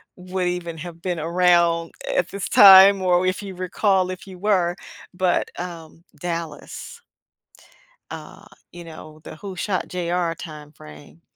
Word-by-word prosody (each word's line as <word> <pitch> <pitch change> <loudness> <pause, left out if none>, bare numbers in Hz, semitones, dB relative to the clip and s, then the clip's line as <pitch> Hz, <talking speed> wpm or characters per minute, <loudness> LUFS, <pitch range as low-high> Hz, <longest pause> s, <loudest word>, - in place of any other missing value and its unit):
would 180 0 -4
even 170 -2 -4
have 170 +1 -9
been 175 -3 -3
around 170 0 +2 0.2
at 180 0 +1
this 200 -1 -5
time 195 0 +8
or 180 0 +2
if 185 +2 -1
you 190 -2 -8
recall 185 +1 0
if 185 -1 -7
you 185 -1 -11
were, 180 -3 +1 0.4
but, 180 0 0
um, 170 -2 -9 0.2
Dallas, 170 - -6 1.1
uh, - - -10 0.3
you 175 0 -10
know, 155 -1 -12
the - - -10
"who 190 +1 -9
shot 190 0 -2
J.R." 175 -1 -2
time 150 -3 -10
frame. 75 - -15
175 Hz, 145 wpm, -22 LUFS, 165-185 Hz, 1.1 s, time